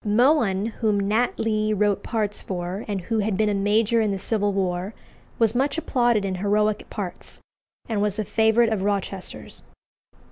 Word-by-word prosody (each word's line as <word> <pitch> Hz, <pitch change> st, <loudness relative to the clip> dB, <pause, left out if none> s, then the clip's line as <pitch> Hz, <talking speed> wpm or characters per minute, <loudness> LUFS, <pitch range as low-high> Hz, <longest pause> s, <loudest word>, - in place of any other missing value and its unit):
Mohun, 215 Hz, -3 st, +3 dB
whom 220 Hz, -2 st, 0 dB
Nat 215 Hz, +5 st, +1 dB
Lee 215 Hz, -1 st, +1 dB
wrote 205 Hz, -1 st, +1 dB
parts 215 Hz, -3 st, -2 dB
for, 180 Hz, +2 st, -4 dB
and 200 Hz, -3 st, -2 dB
who 220 Hz, +5 st, -1 dB
had 210 Hz, -2 st, 0 dB
been 215 Hz, -1 st, +2 dB
a -, -, +1 dB
major 215 Hz, +3 st, +2 dB
in 215 Hz, -, +1 dB
the 195 Hz, -, -1 dB
Civil 205 Hz, +1 st, +1 dB
War, 190 Hz, +1 st, -2 dB, 0.4 s
was 225 Hz, -2 st, +3 dB
much 275 Hz, +4 st, 0 dB
applauded 240 Hz, -9 st, +1 dB
in 190 Hz, -, -2 dB
heroic 205 Hz, +3 st, 0 dB
parts, 195 Hz, -4 st, -5 dB, 0.5 s
and 220 Hz, -3 st, -1 dB
was 205 Hz, 0 st, 0 dB
a 215 Hz, -, -1 dB
favourite 220 Hz, +2 st, +3 dB
of 205 Hz, -, -2 dB
Rochester's. 195 Hz, -1 st, -4 dB
210 Hz, 170 wpm, -24 LUFS, 200-225 Hz, 0.5 s, Mohun